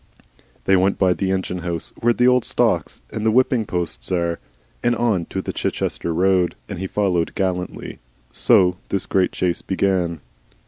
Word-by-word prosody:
They 95 Hz, -, +4 dB
went 95 Hz, +1 st, +2 dB
by 95 Hz, -2 st, +3 dB
the 95 Hz, +1 st, -2 dB
engine 95 Hz, -1 st, -1 dB
house 85 Hz, -1 st, -3 dB
where 120 Hz, -, +2 dB
the 125 Hz, +1 st, +3 dB
old 125 Hz, -1 st, +4 dB
stocks -, -, 0 dB
and 110 Hz, -, -4 dB
the 110 Hz, -, +3 dB
whipping 125 Hz, 0 st, +3 dB
posts 85 Hz, -10 st, -4 dB
are, 85 Hz, -2 st, 0 dB, 0.4 s
and 120 Hz, 0 st, +2 dB
on 110 Hz, -8 st, +1 dB
to 95 Hz, -, -4 dB
the -, -, -4 dB
Chichester 85 Hz, -, -2 dB
road, 90 Hz, +1 st, +2 dB
and 95 Hz, -4 st, -6 dB
he 95 Hz, -, -3 dB
followed 90 Hz, -4 st, 0 dB
gallantly. 90 Hz, -2 st, -3 dB, 0.3 s
So 90 Hz, +8 st, +4 dB
this 100 Hz, -, -1 dB
great 95 Hz, -1 st, +1 dB
chase 90 Hz, -2 st, -1 dB
began. 90 Hz, -4 st, 0 dB
95 Hz, 170 wpm, -21 LUFS, 90-100 Hz, 0.4 s, They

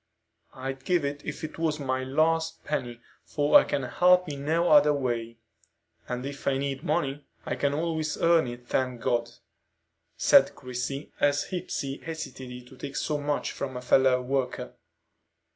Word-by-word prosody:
I'd 135 Hz, +1 st, -5 dB
give 175 Hz, -5 st, +1 dB
it 145 Hz, +1 st, -4 dB
if -, -, -6 dB
it 155 Hz, -, -6 dB
was 155 Hz, -2 st, 0 dB
my 130 Hz, -2 st, -1 dB
last 160 Hz, +4 st, +1 dB
penny, 120 Hz, -5 st, -3 dB, 0.2 s
for 145 Hz, -1 st, +5 dB
I -, -, +2 dB
can 140 Hz, -, -2 dB
help 180 Hz, +7 st, +4 dB
in 140 Hz, -2 st, -5 dB
no 165 Hz, +3 st, +2 dB
other 150 Hz, 0 st, +6 dB
way; 120 Hz, -4 st, -2 dB, 0.7 s
and 125 Hz, +1 st, -4 dB
if 140 Hz, 0 st, -7 dB
I 135 Hz, -1 st, +2 dB
need 135 Hz, 0 st, -2 dB
money, 140 Hz, +1 st, -1 dB, 0.2 s
I -, -, -2 dB
can 140 Hz, 0 st, 0 dB
always 160 Hz, -1 st, -1 dB
earn 165 Hz, -4 st, +4 dB
it, 120 Hz, 0 st, -8 dB
thank 125 Hz, -2 st, -1 dB
God!" 120 Hz, 0 st, 0 dB, 0.9 s
said -, -, +5 dB
Christie, 130 Hz, +3 st, -5 dB
as 145 Hz, +4 st, +1 dB
Hepsey 140 Hz, -6 st, -3 dB
hesitated 130 Hz, -6 st, -7 dB
to 130 Hz, -, -15 dB
take 140 Hz, 0 st, -7 dB
so 150 Hz, -1 st, -1 dB
much 145 Hz, 0 st, -1 dB
from 130 Hz, -2 st, -5 dB
a -, -, -5 dB
fellow 130 Hz, 0 st, +4 dB
worker. 130 Hz, -1 st, -2 dB
140 Hz, 160 wpm, -27 LUFS, 130-150 Hz, 0.9 s, other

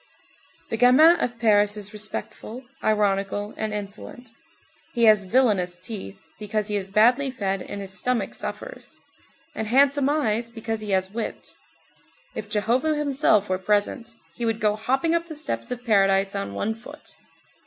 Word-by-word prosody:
The 225 Hz, -, -1 dB
gamin 295 Hz, +8 st, +7 dB
of 240 Hz, -5 st, -2 dB
Paris 210 Hz, -2 st, +3 dB
is 205 Hz, 0 st, -5 dB
respectful, 215 Hz, +3 st, -5 dB, 0.2 s
ironical, 205 Hz, -1 st, 0 dB
and 215 Hz, 0 st, -3 dB
insolent. 210 Hz, +5 st, -7 dB, 0.6 s
He 235 Hz, -, +2 dB
has 215 Hz, -3 st, +6 dB
villainous 190 Hz, -6 st, +2 dB
teeth, 185 Hz, -, -7 dB, 0.2 s
because 210 Hz, 0 st, -2 dB
he 210 Hz, -, -1 dB
is 195 Hz, -1 st, -2 dB
badly 245 Hz, +7 st, +4 dB
fed 195 Hz, -7 st, -2 dB
and 200 Hz, -, -6 dB
his 190 Hz, -1 st, -7 dB
stomach 245 Hz, +6 st, -1 dB
suffers, -, -, -7 dB, 0.5 s
and 220 Hz, -, -4 dB
handsome 275 Hz, +3 st, +4 dB
eyes 235 Hz, -6 st, 0 dB
because 225 Hz, -1 st, -4 dB
he 210 Hz, -, -6 dB
has 190 Hz, -1 st, +1 dB
wit. 225 Hz, +1 st, -5 dB, 0.8 s
If 210 Hz, -, -6 dB
Jehovah 235 Hz, +9 st, +1 dB
himself 280 Hz, -8 st, +2 dB
were 185 Hz, 0 st, -1 dB
present, 210 Hz, +4 st, 0 dB, 0.2 s
he 240 Hz, -, -6 dB
would 225 Hz, -1 st, 0 dB
go 210 Hz, -2 st, +2 dB
hopping 265 Hz, +9 st, 0 dB
up 335 Hz, 0 st, 0 dB
the 315 Hz, -, -8 dB
steps 115 Hz, -, -3 dB
of 245 Hz, 0 st, -5 dB
paradise 195 Hz, -2 st, +3 dB
on 100 Hz, 0 st, -4 dB
one 215 Hz, -, -1 dB
foot. 280 Hz, +7 st, -13 dB
215 Hz, 155 wpm, -24 LUFS, 200-250 Hz, 0.8 s, gamin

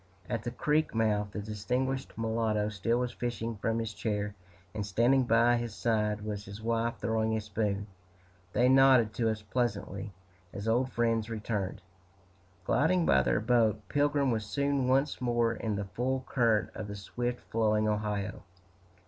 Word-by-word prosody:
At 120 Hz, -3 st, -2 dB
the -, -, -2 dB
creek 150 Hz, +2 st, 0 dB
mouth, 105 Hz, -2 st, +1 dB
the 105 Hz, -1 st, -5 dB
distinguished 125 Hz, +6 st, -2 dB
mulatto 110 Hz, -2 st, 0 dB
still 110 Hz, +3 st, 0 dB
was 125 Hz, 0 st, -1 dB
fishing 115 Hz, -2 st, -3 dB
from 115 Hz, +2 st, -1 dB
his 115 Hz, -1 st, -3 dB
chair, 105 Hz, -2 st, -2 dB, 0.4 s
and 105 Hz, -, -3 dB
standing 120 Hz, +6 st, +3 dB
by 120 Hz, +1 st, +4 dB
his 120 Hz, -1 st, -4 dB
side 105 Hz, -2 st, 0 dB
was 105 Hz, -1 st, -4 dB
his 100 Hz, +2 st, -9 dB
wife 115 Hz, +1 st, 0 dB
throwing 110 Hz, -1 st, 0 dB
a -, -, 0 dB
spoon. 105 Hz, -1 st, -2 dB, 0.7 s
They 125 Hz, -, +4 dB
nodded 130 Hz, -4 st, +6 dB
to 115 Hz, -2 st, +1 dB
us 110 Hz, -1 st, -3 dB
pleasantly, 105 Hz, -3 st, -2 dB, 0.4 s
as 100 Hz, +2 st, -5 dB
old 125 Hz, +3 st, +2 dB
friends 115 Hz, -2 st, 0 dB
returned. 105 Hz, -4 st, -3 dB, 0.8 s
Gliding 165 Hz, -, +2 dB
by 65 Hz, -, +5 dB
their 65 Hz, -, +1 dB
boat, 115 Hz, -2 st, +3 dB
Pilgrim 145 Hz, -2 st, +2 dB
was 110 Hz, -2 st, -1 dB
soon 140 Hz, +3 st, 0 dB
once 135 Hz, +3 st, +1 dB
more 120 Hz, -1 st, +2 dB
in 110 Hz, -2 st, -3 dB
the 100 Hz, 0 st, -3 dB
full 130 Hz, +6 st, -2 dB
current 115 Hz, -4 st, +2 dB
of 105 Hz, -, -6 dB
the 100 Hz, -, -6 dB
swift 120 Hz, +4 st, -4 dB
flowing 110 Hz, -1 st, +2 dB
Ohio. 105 Hz, -1 st, -2 dB
115 Hz, 160 wpm, -30 LUFS, 105-120 Hz, 0.8 s, nodded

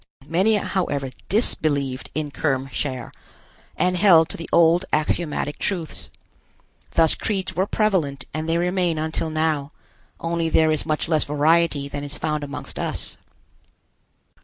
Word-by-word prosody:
Many, 190 Hz, +8 st, +3 dB
however, 145 Hz, -10 st, -1 dB, 0.2 s
disbelieved 145 Hz, -, 0 dB
in 150 Hz, -1 st, -2 dB
Kerm 135 Hz, -3 st, -1 dB
Cher, 130 Hz, -3 st, -3 dB, 0.7 s
and 180 Hz, 0 st, +2 dB
held 175 Hz, -4 st, +6 dB
to -, -, -4 dB
the 165 Hz, -, -7 dB
old 170 Hz, +2 st, +5 dB
axiomatic 150 Hz, -1 st, 0 dB
truths. 175 Hz, -6 st, -3 dB, 0.9 s
Thus 165 Hz, -1 st, +5 dB
creeds 190 Hz, -4 st, -2 dB
were 190 Hz, +3 st, +1 dB
prevalent 170 Hz, -13 st, 0 dB
and 155 Hz, +2 st, -3 dB
they 165 Hz, -, +2 dB
remain 175 Hz, -1 st, +1 dB
until 160 Hz, +1 st, -2 dB
now, 155 Hz, -2 st, 0 dB, 0.5 s
only 165 Hz, 0 st, -1 dB
there 160 Hz, -1 st, +4 dB
is 155 Hz, 0 st, 0 dB
much 155 Hz, 0 st, 0 dB
less 160 Hz, -2 st, +3 dB
variety 150 Hz, 0 st, +2 dB
than 145 Hz, 0 st, -5 dB
is 145 Hz, 0 st, -3 dB
found 150 Hz, -1 st, -2 dB
amongst 145 Hz, 0 st, -6 dB
us. -, -, -3 dB
160 Hz, 135 wpm, -23 LUFS, 145-175 Hz, 0.9 s, held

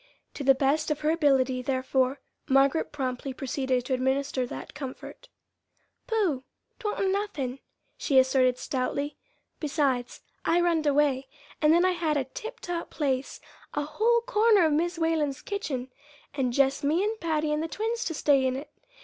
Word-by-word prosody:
To 285 Hz, -, -5 dB
the 270 Hz, 0 st, +6 dB
best 290 Hz, +4 st, +1 dB
of 300 Hz, -1 st, -1 dB
her 305 Hz, +1 st, +2 dB
ability, 270 Hz, -5 st, +2 dB
therefore, 260 Hz, +1 st, 0 dB, 0.3 s
Margaret 270 Hz, +3 st, +3 dB
promptly 265 Hz, -1 st, -3 dB
proceeded 260 Hz, -2 st, -1 dB
to 260 Hz, -, -1 dB
administer 265 Hz, 0 st, 0 dB
that -, -, -8 dB
comfort. 270 Hz, -3 st, -8 dB, 0.8 s
"Pooh! 390 Hz, -, 0 dB, 0.4 s
'twa'n't 415 Hz, -4 st, -1 dB
nothin'," 305 Hz, -11 st, -2 dB, 0.4 s
she 275 Hz, -, +1 dB
asserted 260 Hz, -1 st, +4 dB
stoutly; 280 Hz, +3 st, -2 dB, 0.4 s
"besides, 275 Hz, -5 st, -1 dB, 0.2 s
I 340 Hz, -, +3 dB
runned 335 Hz, -3 st, +2 dB
away, 280 Hz, -2 st, +2 dB, 0.3 s
and 305 Hz, 0 st, +5 dB
then 345 Hz, +2 st, +5 dB
I 370 Hz, -, +4 dB
had 330 Hz, -4 st, 0 dB
a 275 Hz, -, +1 dB
tiptop 350 Hz, -, -6 dB
place 270 Hz, -3 st, -2 dB, 0.4 s
a 295 Hz, -, 0 dB
whole 450 Hz, +10 st, +2 dB
corner 445 Hz, -5 st, +4 dB
of 310 Hz, -, +2 dB
Mis' 345 Hz, +3 st, 0 dB
Whalen's 320 Hz, -4 st, 0 dB
kitchen, 270 Hz, -11 st, -4 dB, 0.4 s
and 265 Hz, -4 st, 0 dB
jest 275 Hz, +2 st, +2 dB
me 315 Hz, +6 st, +2 dB
and 435 Hz, +1 st, -1 dB
Patty 310 Hz, -2 st, 0 dB
and 300 Hz, -, 0 dB
the 325 Hz, -, -2 dB
twins 450 Hz, +6 st, -2 dB
to 325 Hz, -, -2 dB
stay 280 Hz, -2 st, +3 dB
in 255 Hz, -, -1 dB
it. 275 Hz, +3 st, -7 dB
290 Hz, 160 wpm, -27 LUFS, 265-335 Hz, 0.8 s, the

